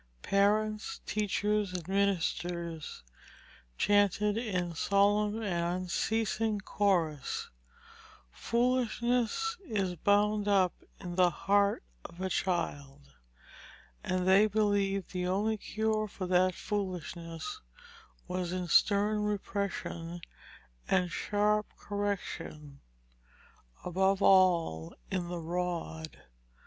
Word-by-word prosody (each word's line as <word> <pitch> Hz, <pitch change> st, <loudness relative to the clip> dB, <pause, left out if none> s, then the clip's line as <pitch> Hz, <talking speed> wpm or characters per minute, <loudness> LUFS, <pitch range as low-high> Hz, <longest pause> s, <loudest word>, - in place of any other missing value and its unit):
Parents, 210 Hz, +2 st, +1 dB
teachers, 210 Hz, -1 st, 0 dB
and 175 Hz, -3 st, -5 dB
ministers 175 Hz, -, -1 dB, 0.7 s
chanted 205 Hz, 0 st, +3 dB
in 185 Hz, -7 st, -2 dB
solemn 205 Hz, +4 st, +2 dB
and 175 Hz, -2 st, -1 dB
unceasing 220 Hz, +3 st, 0 dB
chorus, 175 Hz, -8 st, 0 dB, 0.8 s
"Foolishness 245 Hz, -, 0 dB
is 200 Hz, -, -1 dB
bound 205 Hz, +3 st, +2 dB
up 190 Hz, -3 st, +3 dB, 0.3 s
in 175 Hz, -2 st, -6 dB
the 180 Hz, -1 st, +6 dB
heart 200 Hz, -, +1 dB, 0.2 s
of 170 Hz, -, -11 dB
a 190 Hz, 0 st, -2 dB
child," 145 Hz, -6 st, -2 dB, 0.9 s
and 185 Hz, 0 st, -1 dB
they 195 Hz, +3 st, +6 dB
believed 200 Hz, -2 st, +1 dB
the 180 Hz, -1 st, -2 dB
only 205 Hz, +4 st, +1 dB
cure 215 Hz, 0 st, -1 dB
for 190 Hz, -2 st, -6 dB
that 180 Hz, 0 st, +3 dB
foolishness 185 Hz, -, -4 dB, 0.7 s
was 180 Hz, -1 st, -2 dB
in 180 Hz, -1 st, -3 dB
stern 205 Hz, +3 st, +3 dB
repression 200 Hz, -4 st, -3 dB, 0.7 s
and 180 Hz, -2 st, +2 dB
sharp 210 Hz, +2 st, +1 dB
correction 175 Hz, -8 st, -4 dB, 1.0 s
above 190 Hz, +2 st, +1 dB
all 170 Hz, -, +4 dB, 0.2 s
in 185 Hz, -2 st, -1 dB
the 175 Hz, 0 st, -4 dB
rod. 170 Hz, -2 st, -4 dB
195 Hz, 90 wpm, -31 LUFS, 175-210 Hz, 1.0 s, the